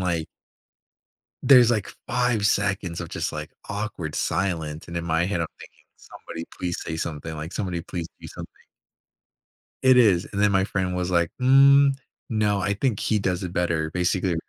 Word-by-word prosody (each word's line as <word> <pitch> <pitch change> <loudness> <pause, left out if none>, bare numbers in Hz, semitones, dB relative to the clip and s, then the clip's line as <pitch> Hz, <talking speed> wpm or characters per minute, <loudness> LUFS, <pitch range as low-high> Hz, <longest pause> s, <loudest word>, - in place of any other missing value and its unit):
like 85 -3 -1 1.2
there's, 125 -4 +7
like, 110 -3 0 0.2
5 120 -4 +1
seconds 100 -5 0
of 85 - -7
just, - - -3
like, - - -6 0.2
awkward 100 -7 -4
silence 80 -5 -2
and 85 - -4
in 85 - -3
my 80 +1 +1
head, 90 -3 -1
I'm 80 - -2
thinking, - - -14 0.2
somebody 85 0 -9
please 90 -1 -3
say 80 - -4
something, 80 0 -4
like, 80 +3 -6
somebody 90 -4 -3
please 85 -1 -5
do - - -10
something. - - -9 1.3
It 130 -1 +6
is, 100 -8 +4
and 100 - -2
then 105 -1 +4
my 95 -1 +3
friend 95 -2 -2
was, 90 0 -2
like, 85 -2 +2
"Mm, 140 +2 +6 0.4
no, 105 -3 +1
I 100 +2 0
think 110 0 -1
he 110 - +1
does 90 -1 -1
it 90 -1 -5
better 85 -3 0
basically, 90 +1 0
90 Hz, 175 wpm, -24 LUFS, 85-105 Hz, 1.3 s, there's